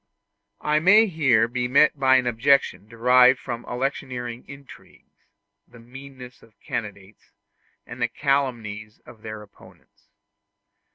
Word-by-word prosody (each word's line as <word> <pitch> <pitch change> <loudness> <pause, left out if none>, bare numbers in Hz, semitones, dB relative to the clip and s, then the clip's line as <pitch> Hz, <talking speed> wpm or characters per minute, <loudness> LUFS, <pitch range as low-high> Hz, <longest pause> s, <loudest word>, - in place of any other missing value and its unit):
I 150 0 +1
may 205 +7 +5
here 135 - +1
be 125 +1 -3
met 140 +3 +3
by 130 -1 +4
an 130 -1 +2
objection 120 -3 +1
derived 125 +3 +4
from 120 -2 -7
electioneering 125 -2 -5
intrigues, 140 -1 -16 0.4
the - - -18
meannesses 125 +1 -13
of 115 - -23
candidates, 105 -2 -8 0.6
and - - -11
the - - +2
calumnies 115 -6 -3
of 110 - -16
their 110 -1 -8
opponents. 100 - -22
125 Hz, 120 wpm, -23 LUFS, 115-140 Hz, 0.6 s, may